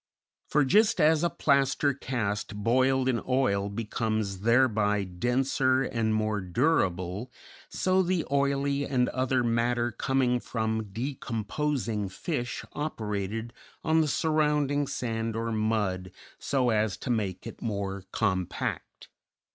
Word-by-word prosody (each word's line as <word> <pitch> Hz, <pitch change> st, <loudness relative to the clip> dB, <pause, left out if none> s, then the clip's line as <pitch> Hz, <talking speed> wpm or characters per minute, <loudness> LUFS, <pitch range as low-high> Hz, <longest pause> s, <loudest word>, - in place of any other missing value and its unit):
For 150 Hz, -1 st, +3 dB
just 215 Hz, -, +4 dB
as 155 Hz, 0 st, +4 dB
a 175 Hz, -, +3 dB
plaster 140 Hz, -1 st, +2 dB
cast 105 Hz, -6 st, -3 dB
boiled 130 Hz, +5 st, +2 dB
in 125 Hz, -3 st, +1 dB
oil 100 Hz, -7 st, +1 dB
becomes 110 Hz, -2 st, -2 dB
thereby 110 Hz, -3 st, +3 dB
denser 130 Hz, +7 st, +1 dB
and 115 Hz, -3 st, -1 dB
more 110 Hz, -1 st, 0 dB
durable, 95 Hz, -, 0 dB, 0.4 s
so 185 Hz, 0 st, +2 dB
the 180 Hz, -2 st, 0 dB
oily 140 Hz, 0 st, +1 dB
and 130 Hz, -3 st, +1 dB
other 130 Hz, -1 st, 0 dB
matter 120 Hz, +1 st, +1 dB
coming 125 Hz, +1 st, +1 dB
from 110 Hz, -2 st, -2 dB
decomposing 115 Hz, 0 st, -2 dB
fish 120 Hz, -, -4 dB
operated 110 Hz, -5 st, -3 dB, 0.3 s
on 160 Hz, 0 st, +3 dB
the 155 Hz, -, +1 dB
surrounding 150 Hz, -2 st, +1 dB
sand 115 Hz, -5 st, -2 dB
or 115 Hz, 0 st, -2 dB
mud 105 Hz, -4 st, 0 dB, 0.3 s
so 130 Hz, -3 st, +1 dB
as 105 Hz, -3 st, +1 dB
to 125 Hz, -, -3 dB
make 100 Hz, -6 st, -2 dB
it -, -, -9 dB
more 100 Hz, -3 st, -3 dB
compact." 95 Hz, -5 st, -2 dB
120 Hz, 120 wpm, -28 LUFS, 105-140 Hz, 0.4 s, just